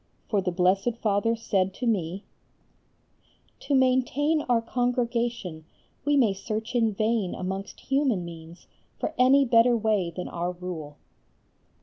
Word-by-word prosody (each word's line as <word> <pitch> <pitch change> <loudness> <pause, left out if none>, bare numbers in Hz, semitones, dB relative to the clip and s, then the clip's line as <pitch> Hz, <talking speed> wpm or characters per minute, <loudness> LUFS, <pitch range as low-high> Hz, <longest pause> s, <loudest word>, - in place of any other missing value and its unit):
For 205 -3 +2
our 180 - -1
Blessed 190 +6 +2
Father 215 +2 +1
said 195 -4 -1
to 250 - -4
me: 195 -4 -1 1.4
"To 285 - -1
maintain 260 +4 +2
our 240 -2 +4
Congregation 235 -7 -2 0.4
we 290 0 +3
may 230 -7 +4
search 220 +3 -5
in 230 -3 +2
vain 215 -2 0
amongst 190 +2 -5
human 270 -10 0
means 165 0 -11 0.3
for - - -3
any 270 +2 +6
better 235 0 +4
way 210 -5 +1
than 175 +2 -6
our 175 +1 -3
Rule." 170 -5 -7
220 Hz, 130 wpm, -26 LUFS, 185-245 Hz, 1.4 s, any